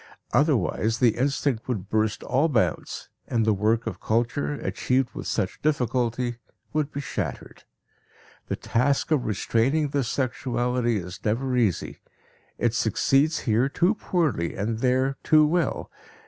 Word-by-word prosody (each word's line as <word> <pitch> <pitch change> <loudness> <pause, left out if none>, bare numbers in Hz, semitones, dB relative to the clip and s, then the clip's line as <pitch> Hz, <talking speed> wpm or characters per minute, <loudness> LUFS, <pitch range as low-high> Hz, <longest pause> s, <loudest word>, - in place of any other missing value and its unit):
Otherwise 115 - +2
the 115 -2 +3
instinct 135 -2 0
would 105 -7 -3
burst 110 0 0
all 135 +6 +2
bounds 110 - -1 0.2
and 115 -2 +1
the 110 - +4
work 110 +3 +1
of - - -5
culture, 120 +6 0
achieved 130 -2 -1
with - - -6
such 95 -4 -2
difficulty, 125 -4 0 0.4
would 150 -1 0
be 145 - -4
shattered. 140 - -5 0.8
The - - -1
task 135 +6 0
of 145 -5 +2
restraining 120 +8 +1
this 135 -4 -1
sexuality 125 -3 0
is 90 -1 -7
never 125 +4 0
easy; 110 -9 0 0.6
it 120 -1 +1
succeeds 135 +7 +2
here 120 +4 +2
too 180 +8 +2
poorly 155 - -1
and 110 +3 -2
there 130 +2 +1
too 155 -1 +5
well. 170 +2 0
125 Hz, 135 wpm, -25 LUFS, 110-140 Hz, 0.8 s, too